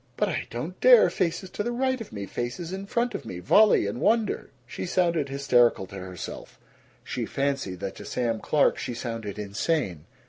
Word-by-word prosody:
"B - - -39
but - - +1
I - - -3
don't 155 +10 -6
dare! 245 -8 +7
Faces 175 +2 -1
to - - -3
the 240 +3 -1
right 260 +1 0
of 225 - -8
me, 100 -2 -5
faces 145 - -4
in 195 +1 -5
front 240 +3 0
of - - -4
me, 100 -6 -7
volley 205 - +5
and 100 +4 -4
wonder!" 220 -1 +1 0.2
She 130 - -6
sounded 170 -5 +1
hysterical 125 -7 +3
to 95 - -12
herself; 90 -2 -8 0.4
she - - -3
fancied 135 -10 -2
that 95 - -4
to - - -9
Sam 115 -3 -1
Clark 150 +5 +2
she 120 - -4
sounded 115 -4 -5
insane. 100 - -2
140 Hz, 195 wpm, -26 LUFS, -, 0.4 s, dare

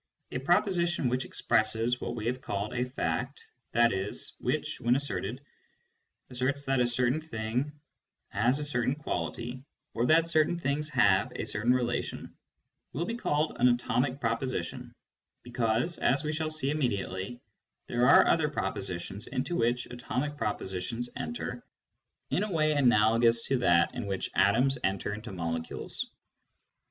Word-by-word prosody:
A 125 - -2
proposition 175 -2 +2
which 125 +1 -1
expresses 115 +3 +2
what - - -3
we 110 -2 -5
have 125 +2 -1
called 100 -2 -3
a 125 0 0
fact, 125 +1 -3 0.3
i.e. 105 -4 +3 0.3
which, - - -2
when 120 +1 +3
asserted, 130 -1 -3 0.9
asserts 135 +3 -1
that 135 -1 +1
a 125 - +3
certain 125 +5 +1
thing 125 -1 -2 0.6
has 120 +7 +2
a 150 - -2
certain 130 -1 +1
quality, 120 - -4 0.3
or 120 +2 0
that 165 +1 +5
certain 160 +1 +2
things 150 -1 -1
have 100 -8 +3
a - - -3
certain 110 +4 +1
relatidn, 120 -1 -1 0.6
will 165 +5 -1
be 230 - -3
called 155 -10 -1
an 125 - +6
atomic 125 +2 +1
pro 115 -3 +1
position, 130 +2 -4 0.5
because, 120 +5 0
as 135 +3 +2
we 150 0 -1
shall 155 0 -1
see 155 -3 0
immediately, 110 -6 -2 0.5
there 120 +2 +2
are - - +8
other 155 -2 +3
propositions 95 -6 -4
into 170 +7 -2
which 120 -1 +1
atomic 125 +4 -3
propositions 110 0 -3
enter 240 - -5 0.7
in - - +1
a 210 - -3
way 155 -3 +2
analogous 115 -4 +4
to 135 -2 0
that 85 -7 +3
in 125 -5 -4
which 95 -1 -2
atoms 125 +6 +3
enter 95 +1 -1
into 110 +2 -7
molecules. 80 -3 -4
125 Hz, 145 wpm, -29 LUFS, 110-145 Hz, 0.9 s, are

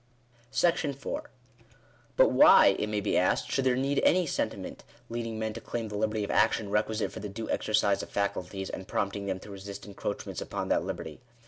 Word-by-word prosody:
§4. 165 - 0 1.0
But - - +6
why, 295 - +7
it 105 - 0
may 105 -1 -1
he 100 - 0
asked, 125 +7 +1
should 135 - +1
there 130 -1 +3
need 135 +2 +1
any 180 0 +4
sentiment - - -3 0.3
leading 115 -1 -4
men 110 0 -2
to 115 - -7
claim 115 -2 -4
the 105 - -6
liberty 110 0 0
of 100 - -3
action 105 -3 +2
requisite 110 +1 0
for - - -7
the 105 - -5
due 110 +3 -6
exercise 105 -2 +2
of - - -8
faculties, 100 -1 -2
and 95 - -7
prompting 100 -1 -2
them 95 - -2
to 105 - -11
resist 100 0 -8
encroach 100 -2 -5
ments - - -5
upon - - -4
that - - +2
liberty - - -6
105 Hz, 195 wpm, -29 LUFS, 100-125 Hz, 1.0 s, why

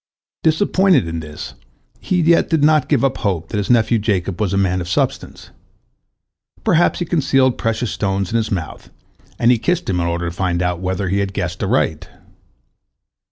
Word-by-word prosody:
Disappointed 185 - +2
in 80 0 -4
this, 75 -2 -8 0.5
he 180 -2 0
yet 165 +1 +3
did 160 -3 +1
not 150 -2 +3
give 135 -3 +2
up 135 - 0
hope 95 -6 -2
that 105 - -2
his 100 - -3
nephew 115 -1 +3
Jacob 100 -3 -1
was 100 -4 0
a 100 - 0
man 95 -2 +1
of 85 - -6
substance. - - -2 1.1
Perhaps 170 +1 +3
he 175 - -2
concealed 135 -6 +1
precious 115 +1 -1
stones 95 -2 -2
in 115 - +1
his 110 -1 -1
mouth, 85 -6 -5 0.5
and 120 +1 +3
he 120 - +2
kissed 180 +6 -1
him 90 -2 0
in 85 - 0
order 85 0 -2
to 85 - -6
find 90 -1 -1
out 90 -1 -1
whether 95 +1 -2
he 100 +2 0
had 100 -1 -2
guessed 90 -2 -4
aright. - - 0
100 Hz, 185 wpm, -19 LUFS, 90-135 Hz, 1.1 s, yet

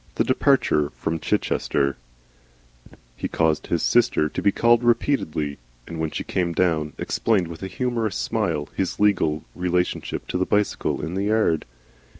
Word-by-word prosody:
THE - - +2
DEPARTURE 75 -1 +2
FROM 80 0 -2
CHICHESTER 70 -2 0 1.2
He - - -3
caused 80 -2 0
his 85 - 0
'sister' 120 -10 +3
to - - -4
be 100 - +4
called 120 +3 +3
repeatedly, 95 - 0 0.3
and 85 -1 -7
when 80 -1 -1
she - - -4
came 85 -2 -1
down, 80 -3 +1
explained 100 -6 0
with 80 -1 -9
a 95 - -3
humorous 115 0 -2
smile 85 -12 -1
his 95 - -2
legal 85 -7 +2
relationship 90 0 -1
to 90 - -1
the 95 - +2
bicycle 105 -6 0
in 80 - -5
the 95 +2 -1
yard. 105 -7 +2
90 Hz, 150 wpm, -23 LUFS, 80-105 Hz, 1.2 s, be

